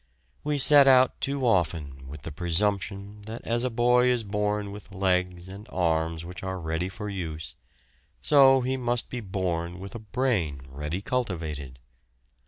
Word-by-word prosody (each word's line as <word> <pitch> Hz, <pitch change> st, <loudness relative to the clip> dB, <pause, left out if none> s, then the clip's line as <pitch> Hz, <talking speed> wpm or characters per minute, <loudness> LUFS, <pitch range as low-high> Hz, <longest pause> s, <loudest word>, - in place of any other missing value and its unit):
We 150 Hz, 0 st, -1 dB
set 140 Hz, 0 st, +8 dB
out 130 Hz, -1 st, +5 dB
too 140 Hz, -1 st, -1 dB
often 75 Hz, -, 0 dB
with 70 Hz, 0 st, -10 dB
the 80 Hz, -, -6 dB
presumption 100 Hz, +4 st, -1 dB
that 115 Hz, +2 st, -7 dB
as 120 Hz, +1 st, +1 dB
a 130 Hz, -, 0 dB
boy 125 Hz, +1 st, +3 dB
is 125 Hz, -2 st, +2 dB
born 105 Hz, 0 st, -2 dB
with 100 Hz, -1 st, -11 dB
legs 90 Hz, -1 st, 0 dB
and 100 Hz, +4 st, -10 dB
arms 80 Hz, -3 st, -1 dB
which 90 Hz, +1 st, -8 dB
are 95 Hz, 0 st, -4 dB
ready 80 Hz, +2 st, -2 dB
for 105 Hz, +2 st, -7 dB
use, 80 Hz, -6 st, -5 dB, 0.6 s
so 135 Hz, -2 st, +6 dB
he 130 Hz, +1 st, -1 dB
must 120 Hz, -1 st, -1 dB
be 125 Hz, -, -4 dB
born 90 Hz, -4 st, -3 dB
with 95 Hz, +1 st, -8 dB
a 115 Hz, -, -6 dB
brain 105 Hz, -, -1 dB
ready 75 Hz, +7 st, -5 dB
cultivated. 80 Hz, -, -3 dB
100 Hz, 160 wpm, -26 LUFS, 85-120 Hz, 0.6 s, set